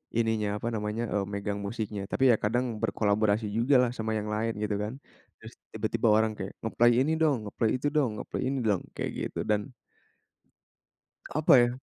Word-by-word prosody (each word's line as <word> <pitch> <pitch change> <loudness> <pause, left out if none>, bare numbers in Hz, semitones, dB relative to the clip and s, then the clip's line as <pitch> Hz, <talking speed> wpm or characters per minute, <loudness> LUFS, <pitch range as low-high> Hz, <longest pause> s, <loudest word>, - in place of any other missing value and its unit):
ininya, 110 -2 +1
apa 120 - -1
namanya, 105 +1 -2
eee, 100 -1 0
megang 100 0 -3
musiknya 105 -2 -4
tapi 135 -1 +3
ya - - +2
kadang 120 +4 +1 0.2
berkolaborasi 105 0 +1
juga 120 +6 +2
lah 120 -1 +1
sama 110 0 -2
yang 105 0 -3
lain, 110 +1 -1
gitu 105 -1 -1
kan. 105 +3 -3 0.5
Terus - - -11 0.2
tiba-tiba 115 - 0
orang 110 0 +3
kayak, 95 -1 -5
nge-play 120 +2 +3
ini 155 - 0
dong, 140 -9 +2
nge-play 110 +2 0
itu 145 - -1
dong, 145 -6 +2
nge-play - - -5
ini 135 -1 -1
dong, 100 -4 +2
kayak - - -3 0.2
gitu - - -7
dan 105 +5 +1 1.6
apa 155 0 +3
ya 120 0 +4
110 Hz, 180 wpm, -28 LUFS, 105-120 Hz, 1.6 s, ya